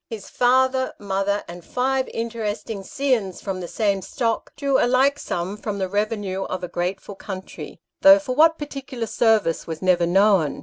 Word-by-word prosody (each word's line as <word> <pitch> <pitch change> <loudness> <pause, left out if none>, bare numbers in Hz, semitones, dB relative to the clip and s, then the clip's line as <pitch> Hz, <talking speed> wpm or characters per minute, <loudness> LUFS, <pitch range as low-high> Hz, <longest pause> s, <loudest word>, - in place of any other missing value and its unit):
His 220 -4 -8
father, 260 +1 +2
mother, 200 0 -1
and 175 0 -10
five 260 +4 0
interesting 225 -2 -4
scions 225 -4 -1
from 190 -2 -4
the 175 - -5
same 200 0 0
stock, 230 +2 -2
drew 280 -2 +1
a - - +3
like 270 +3 +3
sum 180 +4 -3
from 210 -1 -4
the 190 -1 -1
revenue 205 -1 -2
of 185 0 -5
a - - -2
grateful 185 +4 -4
country, 190 -1 -8 0.2
though 290 0 +9
for 285 -4 -3
what 320 +4 +5
particular 275 -5 -5
service 220 -7 +1
was 160 -1 -5
never 175 -2 +3
known. 190 -4 +3
210 Hz, 170 wpm, -23 LUFS, 190-255 Hz, 0.2 s, though